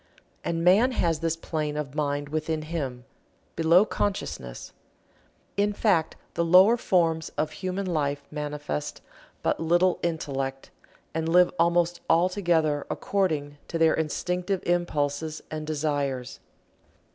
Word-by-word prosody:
And 165 Hz, 0 st, -1 dB
man 210 Hz, +9 st, +5 dB
has 165 Hz, -8 st, +1 dB
this 165 Hz, -1 st, 0 dB
plane 155 Hz, -2 st, -3 dB
of 145 Hz, -3 st, -4 dB
mind 145 Hz, -1 st, -1 dB
within 155 Hz, +1 st, -2 dB
him, 135 Hz, -6 st, -4 dB, 0.5 s
below 170 Hz, +5 st, +5 dB
consciousness. 65 Hz, -, -3 dB, 0.8 s
In 205 Hz, +1 st, +2 dB
fact 190 Hz, -7 st, +1 dB, 0.2 s
the 170 Hz, -, 0 dB
lower 185 Hz, +7 st, +7 dB
forms 165 Hz, -7 st, +1 dB
of 155 Hz, 0 st, 0 dB
human 185 Hz, +4 st, -3 dB
life 145 Hz, -5 st, -1 dB
manifest 150 Hz, -, -4 dB, 0.4 s
but -, -, +1 dB
little 175 Hz, +3 st, +2 dB
Intellect, 135 Hz, -5 st, -3 dB, 0.4 s
and 160 Hz, 0 st, -1 dB
live 180 Hz, +1 st, +5 dB
almost 170 Hz, 0 st, +2 dB
altogether 165 Hz, -4 st, +2 dB
according 150 Hz, -7 st, -1 dB
to 165 Hz, -, -3 dB
their 160 Hz, -1 st, +4 dB
Instinctive 180 Hz, +4 st, -1 dB
impulses 155 Hz, -3 st, -1 dB
and 155 Hz, -1 st, -5 dB
desires. 145 Hz, -4 st, -2 dB
160 Hz, 120 wpm, -26 LUFS, 150-175 Hz, 0.8 s, lower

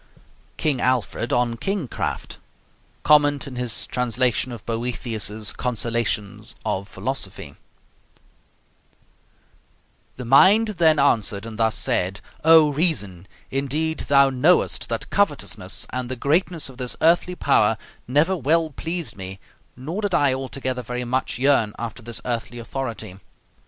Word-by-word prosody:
KING 145 Hz, -5 st, 0 dB
ALFRED 125 Hz, -2 st, 0 dB
ON 120 Hz, -1 st, +1 dB
KING 195 Hz, -, -2 dB
CRAFT -, -, -4 dB, 0.6 s
Comment 145 Hz, -2 st, +4 dB
in 135 Hz, -, -8 dB
his 125 Hz, -2 st, -2 dB
Translation 125 Hz, 0 st, 0 dB
of 115 Hz, -3 st, -9 dB
Boethius's 115 Hz, -2 st, -2 dB
'Consolations 115 Hz, -3 st, -2 dB
of 100 Hz, -2 st, -2 dB
Philosophy' 100 Hz, -, -5 dB, 2.6 s
The 125 Hz, -, -7 dB
mind 195 Hz, -, +6 dB
then 160 Hz, -2 st, +5 dB
answered 110 Hz, -7 st, +1 dB
and 115 Hz, -1 st, -8 dB
thus 110 Hz, -1 st, +2 dB
said: 95 Hz, +3 st, 0 dB, 0.2 s
O 160 Hz, -1 st, +7 dB
Reason, 105 Hz, -, -1 dB, 0.2 s
indeed 150 Hz, +4 st, -1 dB
thou 140 Hz, -1 st, +5 dB
knowest 150 Hz, +8 st, +2 dB
that -, -, -4 dB
covetousness -, -, 0 dB
and 125 Hz, -1 st, -3 dB
the 130 Hz, -, -3 dB
greatness 160 Hz, +5 st, 0 dB
of 130 Hz, -2 st, -13 dB
this 125 Hz, -1 st, -3 dB
earthly 175 Hz, +2 st, +3 dB
power 110 Hz, -9 st, +3 dB, 0.3 s
never 150 Hz, +9 st, +2 dB
well 160 Hz, +1 st, +1 dB
pleased 165 Hz, +3 st, -4 dB
me, 95 Hz, 0 st, -8 dB, 0.4 s
nor 160 Hz, +11 st, -4 dB
did 205 Hz, -3 st, 0 dB
I 140 Hz, -2 st, +3 dB
altogether 130 Hz, -1 st, -3 dB
very 125 Hz, +1 st, -4 dB
much 130 Hz, +1 st, -1 dB
yearn 125 Hz, -5 st, +2 dB
after 115 Hz, +1 st, -6 dB
this 115 Hz, +1 st, -3 dB
earthly 120 Hz, 0 st, -3 dB
authority. 115 Hz, -5 st, -5 dB
125 Hz, 125 wpm, -23 LUFS, 115-145 Hz, 2.6 s, O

